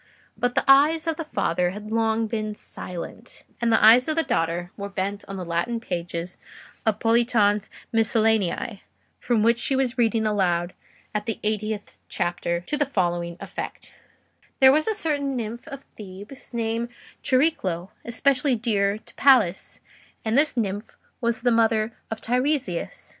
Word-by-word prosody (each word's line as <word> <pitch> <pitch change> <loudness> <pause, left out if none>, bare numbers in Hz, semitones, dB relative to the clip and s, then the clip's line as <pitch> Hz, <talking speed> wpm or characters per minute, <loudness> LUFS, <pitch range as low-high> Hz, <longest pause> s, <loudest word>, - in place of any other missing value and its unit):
But 245 0 -1
the - - +2
eyes 295 +4 +6
of 325 -1 -1
the 325 - -4
father 180 - 0
had 210 +3 -8
long 225 0 +1
been 215 -1 -3
silent, 185 +5 -7 0.2
and 235 -1 +2
the 225 - +5
eyes 240 +3 +8
of 310 - 0
the 325 - +2
daughter 170 - -1
were 200 0 -5
bent 200 +1 -3
on 195 - -6
the 185 -2 -5
Latin 175 +8 -1
pages 175 -3 -5 0.5
of 215 -2 +3
Politian's 225 -3 +3 0.2
'Miscellanea,' 220 -2 +1 0.4
from 230 -3 +1
which 235 +1 +3
she 270 - 0
was 260 -1 0
reading 225 -1 +2
aloud 180 -4 +1 0.4
at 210 0 -2
the 225 - -2
eightieth 215 -1 -3
chapter, 175 -1 -1
to 295 +11 -2
the 290 -2 +1
following 175 -7 -1
effect:— - - -7 0.7
"There 265 0 +8
was 310 +3 +2
a 440 - +1
certain 285 -7 -1
nymph 235 0 -5
of 275 0 -8
Thebes 205 +6 -10
named 230 0 -2 0.3
Chariclo, 200 - +1
especially 260 +3 +2
dear 210 -3 +1
to - - -17
Pallas; 235 -10 +3 0.4
and 220 +1 +1
this 290 -1 +3
nymph 205 -1 -3 0.2
was 235 0 0
the 245 - +4
mother 225 -1 +2 0.2
of 225 0 -5
Teiresias. 250 - -1
225 Hz, 155 wpm, -24 LUFS, 200-250 Hz, 0.7 s, eyes